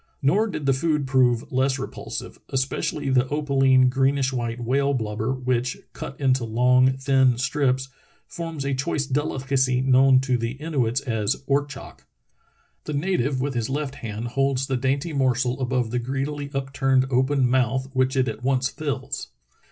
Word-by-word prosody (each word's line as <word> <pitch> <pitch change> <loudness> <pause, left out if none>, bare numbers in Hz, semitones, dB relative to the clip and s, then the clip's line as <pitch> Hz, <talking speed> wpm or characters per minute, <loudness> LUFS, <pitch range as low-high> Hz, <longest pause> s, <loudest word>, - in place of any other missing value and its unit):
Nor 200 +11 +3
did 155 -8 -5
the 135 - +4
food 150 +1 0
prove 125 -3 +2
less 130 +1 +1
repulsive, - - -6
especially 135 +2 -1
the 130 0 +3
opal 145 -1 -1
ine, 130 -1 +6
greenish 135 +1 +1
white 120 -1 -3
whale 140 +4 +1
blubber, 110 0 -2
which, 125 -1 -1 0.2
cut 135 - -8
into 130 -3 +2
long, 125 +3 +3
thin 130 -2 +3
strips, 130 +1 0 0.4
forms 165 -4 -6
a 140 - 0
choice 135 +2 -1
delicacy 130 -2 0
known 130 0 +5
to 130 -2 0
the 115 +1 -2
Inuits 135 -4 -1
as 110 -1 -2
ortchok. 145 0 -3 0.8
The 150 - -4
native 140 -4 0
with 140 +1 -1
his 115 -1 -2
left 140 0 -2
hand 115 -3 -5
holds 135 +1 0
the 135 - -1
dainty 135 +5 -1
morsel 130 -1 +1
above 125 -3 0
the 125 - 0
greedily 140 +3 -3
upturned 135 -1 +1
open 130 +1 +2
mouth 130 +1 +1
which 130 0 +1
it 130 -1 +2
at 110 +1 -5
once 130 0 +1
fills. 140 -3 -4
130 Hz, 160 wpm, -24 LUFS, 125-140 Hz, 0.8 s, ine